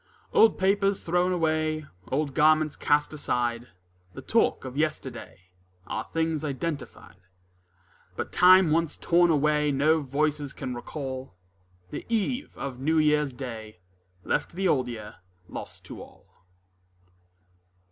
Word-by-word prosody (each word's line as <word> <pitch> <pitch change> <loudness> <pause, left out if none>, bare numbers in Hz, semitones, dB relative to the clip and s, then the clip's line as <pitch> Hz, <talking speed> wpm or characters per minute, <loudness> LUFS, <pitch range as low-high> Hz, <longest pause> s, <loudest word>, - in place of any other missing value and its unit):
Old 225 - +5
papers 195 +1 +1
thrown 180 +2 +1
away, 155 -2 0 0.3
Old 140 +1 0
garments 155 0 +3
cast 150 +1 +1
aside, 120 -4 -1 0.5
The - - -8
talk - - +1
of 130 0 -7
yesterday, 120 - -4 0.3
Are 110 - -4
things 160 -2 -1
identified; 145 - -5 1.0
But - - -4
time 185 -2 +6
once 165 0 +1
torn 175 0 +3
away 150 -1 +2
No 155 +3 +3
voices 145 +1 -1
can 130 -3 -5
recall: 130 - -6 0.6
The - - -5
eve 235 +5 -1
of 135 -2 -5
New 160 +4 +1
Year's 150 -2 +3
Day 115 -5 -8 0.5
Left - - -1
the 190 +2 0
Old 130 -7 +2
Year 110 -4 -8 0.3
lost - - -8
to - - -9
all. - - -15
150 Hz, 125 wpm, -27 LUFS, 130-165 Hz, 1.0 s, time